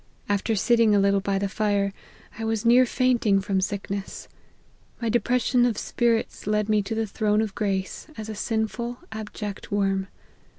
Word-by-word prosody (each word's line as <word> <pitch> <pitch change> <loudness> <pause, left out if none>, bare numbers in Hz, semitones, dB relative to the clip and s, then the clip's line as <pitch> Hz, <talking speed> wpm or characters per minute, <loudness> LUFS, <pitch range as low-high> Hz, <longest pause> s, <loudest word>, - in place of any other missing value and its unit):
After 205 +2 0
sitting 225 +1 +4
a - - +4
little 200 0 +3
by 195 0 -1
the 200 +1 0
fire, 200 -1 0 0.5
I - - -3
was 225 0 -1
near 245 +2 +6
fainting 235 -6 +2
from 190 0 0
sickness. 200 0 -4 0.7
My 230 - -1
de 240 +2 +3
pression 245 +2 +2
of 240 -4 +1
spirits 235 -4 0
led 210 0 +2
me^to 215 +1 0
the 225 0 0
throne 210 0 0
of 220 -3 -1
grace, 195 +2 -2
as 215 -1 -6
a 220 - -4
sinful, 225 +3 -2
abject 210 -1 -6
worm. 195 -1 +1
210 Hz, 165 wpm, -25 LUFS, 200-230 Hz, 0.7 s, near